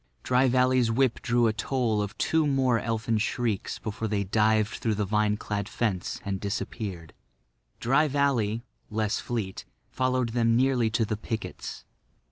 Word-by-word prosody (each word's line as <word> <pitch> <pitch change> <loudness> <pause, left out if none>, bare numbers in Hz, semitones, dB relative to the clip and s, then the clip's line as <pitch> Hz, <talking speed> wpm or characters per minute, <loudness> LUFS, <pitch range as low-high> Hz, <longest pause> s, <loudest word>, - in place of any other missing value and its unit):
Dry 130 +1 +3
Valley's 125 -1 +3
whip 125 +1 +1
drew 120 -2 +2
a 110 - +3
toll 115 -1 0
of 105 +1 -5
two 160 -1 +2
more 130 -4 +2
elfin 115 0 -1
shrieks 110 -2 -1
before 110 +1 -4
they 100 -1 0
dived 110 +1 +2
through 110 -2 0
the 105 0 0
vine 105 +1 +1
clad 105 -2 -3
fence 100 -7 -2
and 95 -1 -2
disappeared. 100 -4 -4 0.7
Dry 135 +6 +3
Valley, 125 -6 +1 0.3
less 110 -1 0
fleet, 110 -6 -4 0.3
followed 130 -2 0
them 115 0 +2
nearly 125 -2 +3
to 115 +1 +1
the 110 0 -2
pickets. 110 +1 -6
115 Hz, 150 wpm, -27 LUFS, 105-125 Hz, 0.7 s, Dry